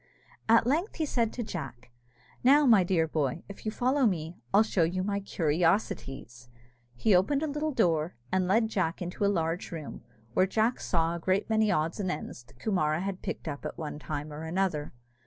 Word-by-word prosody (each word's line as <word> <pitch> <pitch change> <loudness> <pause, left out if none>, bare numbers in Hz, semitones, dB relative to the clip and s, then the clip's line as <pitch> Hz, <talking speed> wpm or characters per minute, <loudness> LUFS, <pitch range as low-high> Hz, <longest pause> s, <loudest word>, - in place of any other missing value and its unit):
At 230 0 +6
length 320 - 0
said 235 -4 +1
he - - -11
to 240 - -3
Jack, 125 - -7 0.5
"Now, 285 +4 +6
my 220 -7 +6
dear 175 -3 +1
boy, 150 0 -1
if 200 +2 -9
you - - 0
follow 255 +3 +2
me, 165 -3 -2 0.2
I'll 205 +3 +6
show 210 -4 0
you 180 +3 +1
my 200 +1 -1
curiosities!" 155 - -1 0.5
He 205 - +2
opened 275 +11 +2
a - - 0
little 300 +1 -2
door, 170 - +1 0.2
and 185 -1 +1
led 220 +4 +3
Jack 185 -5 -1
into 180 +3 -4
a - - +4
large 170 -3 -1
room, 160 -4 -7 0.3
where 185 +9 +3
Jack 220 +5 +1
saw 165 -1 0
a 170 - -4
great 190 +5 0
many 220 -1 +3
odds 160 +4 0
and 190 -2 -1
ends 150 -5 -5
that 120 - -21
Coomara 160 - 0
had 195 -1 -4
picked - - -5
up 145 -2 -5
at 150 - -5
one 150 -2 -5
time 150 0 -5
or 150 - -7
another. 160 -2 -1
185 Hz, 195 wpm, -29 LUFS, 155-220 Hz, 0.5 s, At